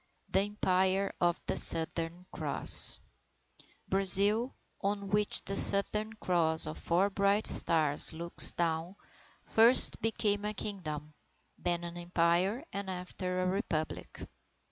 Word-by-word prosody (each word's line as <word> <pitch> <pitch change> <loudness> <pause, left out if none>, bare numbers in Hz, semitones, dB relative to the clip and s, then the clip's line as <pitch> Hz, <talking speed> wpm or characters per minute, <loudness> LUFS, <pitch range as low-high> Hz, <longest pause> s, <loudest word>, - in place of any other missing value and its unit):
THE - - -1
EMPIRE 195 -1 -3
OF 175 0 -2
THE - - -5
SOUTHERN 165 +2 0
CROSS - - +5 0.9
Brazil, 200 +5 +3 0.3
on 200 0 -6
which 210 0 -3
the 195 - -5
Southern 210 +3 0
Cross 170 -6 -3
of 155 - -10
four 185 +4 -3
bright 200 +2 -2
stars, 155 -3 +4
looks 170 +1 +4
down, 165 +2 -6 0.5
first 230 +3 +5
became 210 -2 -4
a 210 0 -6
Kingdom, 155 -8 -9 0.5
then 175 -1 -5
an 170 0 -11
Empire 175 - -3
and 200 -1 -8
after 180 0 -8
that 185 - -4
a - - -3
Republic. 165 -6 -8
185 Hz, 120 wpm, -27 LUFS, 170-205 Hz, 0.9 s, CROSS